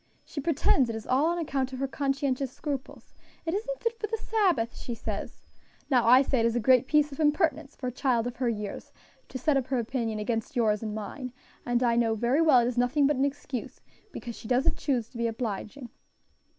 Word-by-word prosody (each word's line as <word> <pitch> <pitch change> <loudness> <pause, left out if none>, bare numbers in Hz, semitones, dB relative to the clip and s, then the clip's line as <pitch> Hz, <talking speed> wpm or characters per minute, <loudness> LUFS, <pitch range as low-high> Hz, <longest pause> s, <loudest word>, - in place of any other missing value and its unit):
"She 290 - -5
pretends 275 -4 +2
it 225 - -3
is 220 - -6
all 270 +5 +2
on 345 +1 0
account 270 -5 -2
of 265 +1 -3
conscientious 275 -2 -1
scruples. 275 -2 -6 0.3
'It 325 - -1
isn't - - -3
fit 460 -1 -1
for 430 - -2
the 450 +2 -2
Sabbath,' 370 - +1
she 240 - -5
says. 215 -2 -6 0.5
Now 245 -3 +4
I 255 +3 +8
say 265 -2 +1
it 230 - +2
is 230 - -1
a - - +2
great 255 +2 +4
piece 300 0 +3
of 275 - -9
impertinence 300 -1 +1
for 260 - -7
a 250 - -1
child 245 -2 +1
of 245 -1 -5
her 250 -1 +1
years 210 -3 -5 0.4
to - - -5
set 280 +3 +2
up 260 -2 -1
her 265 - 0
opinion 230 -2 -2
against 225 +1 -2
yours 215 -4 +2
and 215 -2 -4
mine; 250 +4 -6 0.3
and 245 +1 +2
I 235 -1 +3
know 225 -2 +2
very 240 +7 +2
well 305 -7 +6
it 235 - +1
is 245 -1 -1
nothing 255 +4 +3
but 290 -1 +2
an 270 - +3
excuse, 275 -3 -5 0.3
because 235 -2 -7
she - - -10
doesn't 250 +2 +2
choose 245 -5 0
to 235 - -10
be 235 - +1
obliging." 230 +2 -4
255 Hz, 220 wpm, -28 LUFS, 235-285 Hz, 0.5 s, I